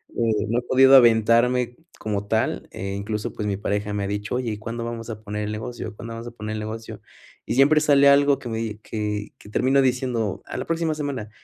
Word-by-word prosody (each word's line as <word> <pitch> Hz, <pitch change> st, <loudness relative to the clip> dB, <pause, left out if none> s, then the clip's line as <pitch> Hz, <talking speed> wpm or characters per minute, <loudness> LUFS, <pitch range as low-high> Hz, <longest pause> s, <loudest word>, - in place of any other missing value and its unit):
eh, 110 Hz, -3 st, +1 dB
no 120 Hz, +2 st, +2 dB
he -, -, -7 dB
podido 130 Hz, +2 st, +6 dB
aventarme 120 Hz, +1 st, +4 dB, 0.2 s
como 105 Hz, -2 st, -3 dB
tal, 110 Hz, +1 st, -1 dB
eh, 95 Hz, +1 st, -5 dB
incluso, 105 Hz, +2 st, -4 dB
pues, 105 Hz, -1 st, -4 dB
mi 100 Hz, -1 st, -1 dB
pareja 105 Hz, 0 st, -2 dB
me 100 Hz, -1 st, -2 dB
ha -, -, -2 dB
dicho: 105 Hz, +3 st, -3 dB
"Oye, 125 Hz, -3 st, -1 dB
¿y 105 Hz, -, -4 dB
cuándo 115 Hz, +1 st, -5 dB
vamos 115 Hz, 0 st, -6 dB
a 110 Hz, -1 st, -6 dB
poner 105 Hz, 0 st, -4 dB
el 105 Hz, -, -3 dB
negocio? 110 Hz, 0 st, -6 dB
¿Cuándo 115 Hz, +1 st, -8 dB
vamos 115 Hz, +1 st, -7 dB
a -, -, -7 dB
poner 110 Hz, -1 st, -6 dB
el -, -, -4 dB
negocio?". 110 Hz, +1 st, -7 dB, 0.4 s
Y -, -, -2 dB
siempre 145 Hz, +3 st, +5 dB
sale 140 Hz, -2 st, +5 dB
algo 140 Hz, 0 st, +4 dB
que 120 Hz, -, -8 dB
me 110 Hz, -1 st, -3 dB
que 105 Hz, -1 st, -4 dB
que 105 Hz, -, -15 dB
termino 135 Hz, +5 st, +3 dB
diciendo: 125 Hz, -5 st, -1 dB
"A -, -, -7 dB
la -, -, -3 dB
próxima 165 Hz, -1 st, 0 dB
semana. 140 Hz, -8 st, -4 dB
115 Hz, 225 wpm, -23 LUFS, 105-125 Hz, 0.4 s, podido